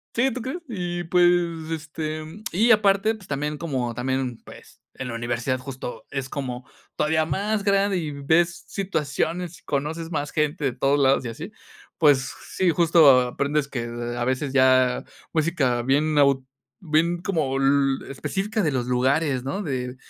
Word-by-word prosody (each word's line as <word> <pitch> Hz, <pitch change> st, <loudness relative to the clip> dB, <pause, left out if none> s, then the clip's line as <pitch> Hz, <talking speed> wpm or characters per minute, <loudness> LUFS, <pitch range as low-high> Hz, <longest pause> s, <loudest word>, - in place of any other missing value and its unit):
Sí, 260 Hz, +3 st, +3 dB
¿tú 245 Hz, -1 st, -5 dB
crees? 295 Hz, +8 st, -4 dB
Y 175 Hz, -4 st, -3 dB
pues, 175 Hz, +1 st, +4 dB, 0.4 s
este, 155 Hz, 0 st, -4 dB, 0.3 s
y 220 Hz, +7 st, +3 dB
aparte, 210 Hz, 0 st, +4 dB
pues 200 Hz, -4 st, -15 dB
también 150 Hz, +1 st, -2 dB
como 130 Hz, -8 st, -3 dB
también, 130 Hz, -1 st, -2 dB
pues, -, -, -14 dB
en 130 Hz, -, -6 dB
la 115 Hz, -, -5 dB
universidad 120 Hz, +2 st, -1 dB
justo, 130 Hz, -1 st, -7 dB
es 135 Hz, -1 st, -4 dB
como 125 Hz, -3 st, -5 dB, 0.3 s
todavía 155 Hz, +1 st, +1 dB
más 200 Hz, +6 st, -1 dB
grande, 200 Hz, -1 st, +2 dB
y 155 Hz, -3 st, -3 dB
ves 160 Hz, +5 st, +1 dB
situaciones, 175 Hz, -1 st, -2 dB
y -, -, -31 dB
conoces 160 Hz, +4 st, -3 dB
más 145 Hz, -2 st, -2 dB
gente 150 Hz, 0 st, -1 dB
de 130 Hz, -, 0 dB
todos 135 Hz, +3 st, +1 dB
lados 135 Hz, -1 st, +3 dB
y -, -, -3 dB
así. 160 Hz, -, -7 dB, 0.5 s
Pues 145 Hz, -5 st, +5 dB
s -, -, -7 dB, 0.2 s
sí, 185 Hz, -2 st, +3 dB
justo 160 Hz, -5 st, +6 dB
aprendes 140 Hz, +3 st, -1 dB
que, 120 Hz, -4 st, -4 dB
a 120 Hz, +1 st, -4 dB
veces 130 Hz, +2 st, -1 dB
ya, 130 Hz, -1 st, +4 dB, 0.3 s
música 150 Hz, -7 st, +1 dB
bien 145 Hz, +5 st, +1 dB
nau 140 Hz, -3 st, +3 dB, 0.3 s
bien 170 Hz, 0 st, +1 dB
como 150 Hz, -8 st, 0 dB
l 135 Hz, 0 st, +2 dB
específica 200 Hz, -, -2 dB
de 160 Hz, -6 st, +1 dB
los 125 Hz, -3 st, -1 dB
lugares, 130 Hz, +2 st, +1 dB
¿no? 190 Hz, +10 st, -3 dB
De 125 Hz, -4 st, -3 dB
145 Hz, 165 wpm, -24 LUFS, 130-170 Hz, 0.5 s, justo